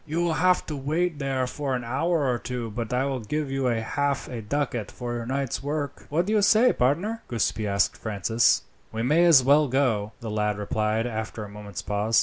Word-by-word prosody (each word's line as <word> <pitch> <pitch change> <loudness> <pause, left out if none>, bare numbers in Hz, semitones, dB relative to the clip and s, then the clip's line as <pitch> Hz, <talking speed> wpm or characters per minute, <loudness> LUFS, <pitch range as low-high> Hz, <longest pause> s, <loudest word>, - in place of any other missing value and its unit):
"You 160 +3 -2
will 170 -2 +1
have 180 +2 +2
to 155 - -4
wait 155 +4 -1
there 135 -2 0
for 135 +1 -3
an 125 - -3
hour 145 +6 0
or 125 -2 0
two, 120 -3 -4
but 115 +1 -4
I 125 +2 +1
will 135 -2 -2
give 145 +5 -3
you 135 -1 -1
half 125 +4 0
a 120 -3 -5
ducat 120 -1 -2
for 120 -1 -5
your 120 -1 -4
night's 135 -1 -2
work." 145 0 -4
"What 165 +4 +1
do 210 - -1
you 215 - +4
say, 220 +5 +5
partner?" 175 - 0
Giuseppi 110 -2 -1
asked 100 0 +1
Francis. 110 +1 +2 0.3
"We 110 +1 -3
may 155 +7 +4
as 155 -7 +7
well 145 +3 +5
go," 120 -6 0
the 115 -2 -5
lad 105 -1 0
replied 110 +2 0
after 110 -2 -4
a 105 - -8
moment's 105 -2 -8
pause. 105 +2 +2
125 Hz, 210 wpm, -26 LUFS, 110-145 Hz, 0.3 s, as